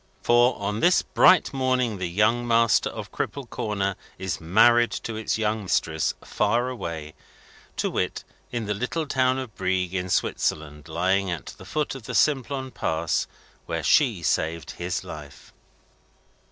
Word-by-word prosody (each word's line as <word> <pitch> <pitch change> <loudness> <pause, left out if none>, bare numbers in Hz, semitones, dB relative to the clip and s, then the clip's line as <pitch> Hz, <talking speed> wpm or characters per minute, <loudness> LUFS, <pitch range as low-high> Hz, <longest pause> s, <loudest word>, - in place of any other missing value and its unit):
For, 120 +1 +4
on 105 +1 -2
this 180 +7 +4
bright 185 -5 +4
morning 130 -5 0
the 90 -2 -2
young 110 +6 +2
master 115 -3 +3
of - - -8
Cripple 140 -3 -4
Corner 100 -3 -2 0.2
is 95 -4 -4
married 120 +8 +5
to 115 - -5
its 110 0 -1
young 110 0 0
mistress, 80 -4 0
far 120 +2 0
away: 80 -10 -6 0.6
to - - 0
wit, - - -2 0.3
in 120 -2 -3
the 105 - -1
little 125 +10 -2
town 130 -2 +1
of 130 -6 -6
Brieg, 95 -1 -1
in 90 -1 -2
Switzerland, 75 -3 -1
lying 95 +4 +1
at 85 -4 -5
the 95 - -11
foot 150 +8 -2
of 135 -4 -9
the - - -5
Simplon 135 -2 +1
Pass 80 -5 -1 0.4
where - - -3
she - - +3
saved 80 0 -1
his 85 -1 -3
life. 75 -2 -11
105 Hz, 155 wpm, -25 LUFS, 85-120 Hz, 0.6 s, married